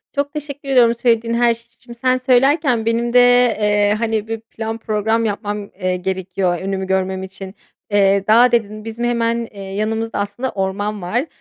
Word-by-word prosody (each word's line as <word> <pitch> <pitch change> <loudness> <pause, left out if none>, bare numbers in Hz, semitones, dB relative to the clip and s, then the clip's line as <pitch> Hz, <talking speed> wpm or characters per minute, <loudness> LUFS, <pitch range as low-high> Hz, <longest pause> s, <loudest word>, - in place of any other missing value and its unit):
Çok 285 +1 -1
teşekkür 285 -2 -6
ediyorum 240 -3 +4
söylediğin 230 -1 +1
her 235 0 +3
şey 230 +1 -12
için. 240 - -16
Sen 255 +2 +1
söylerken 255 -1 +2
benim 235 +1 0
de, 250 - +7 0.4
eee, 205 0 +2
hani, 220 -2 -1
bir 225 0 -4
plan 225 0 -6
program 220 +1 0
yapmam, 205 -1 -3
eee, 185 -1 0
gerekiyor 185 -1 -2
önümü 190 0 -3
görmem 190 0 -1
için. 190 +1 -9 0.4
Eee, 200 -1 +3
"dağ" 235 +3 +6
dedin, 215 -2 -1
bizim 230 +2 -4
hemen, 235 -1 0
eee, 200 -1 -10
yanımızda 215 +3 -3
aslında 205 +6 -3
orman 200 +2 -3
var 235 - -1
225 Hz, 170 wpm, -19 LUFS, 200-235 Hz, 0.4 s, de